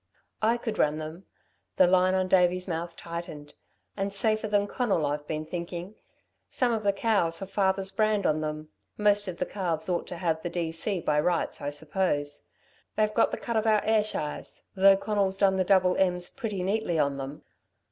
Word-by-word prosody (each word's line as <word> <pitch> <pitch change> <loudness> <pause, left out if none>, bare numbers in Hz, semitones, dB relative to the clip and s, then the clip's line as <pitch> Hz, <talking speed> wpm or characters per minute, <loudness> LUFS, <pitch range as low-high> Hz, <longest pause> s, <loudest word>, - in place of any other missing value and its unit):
"I 225 +2 +3
could 225 -2 -4
run 150 0 +2
them." 155 +4 -8 0.5
The 185 - +7
line 185 +1 +3
on 185 0 +1
Davey's 180 0 +3
mouth 170 0 -4
tightened. 165 -3 -7 0.4
"And 195 0 -2
safer 215 +2 +1
than 205 -1 +2
Conal, 205 - 0
I've 145 +1 -3
been 155 0 -3
thinking. 175 +3 -5 0.6
Some 245 -2 +1
of 220 - -1
the 200 -1 +2
cows 195 -5 +1
have 195 0 -7
father's 190 -1 +1
brand 215 0 +1
on 155 0 +2
them. 155 0 -4 0.3
Most 205 -1 +3
of 180 -2 -5
the 180 - -1
calves 175 -5 -3
ought 175 -1 -1
to 175 - -6
have 165 -2 -1
the 175 - -3
D.C. 170 +3 -2
by 150 - +1
rights, 170 +1 0
I 145 - -2
suppose. 145 -1 -2 0.5
They've 215 0 +1
got 230 - +3
the - - -4
cut 235 -1 -2
of 220 0 +1
our 215 -1 +4
Ayrshires, 215 -8 -1
though 195 0 +6
Conal's 195 -2 0
done 195 -1 +3
the 185 - +2
double 185 -1 +3
M's 180 -2 +1
pretty 215 -8 -4
neatly 195 -3 0
on 140 -2 +1
them. 135 +2 -7
185 Hz, 190 wpm, -27 LUFS, 165-205 Hz, 0.6 s, The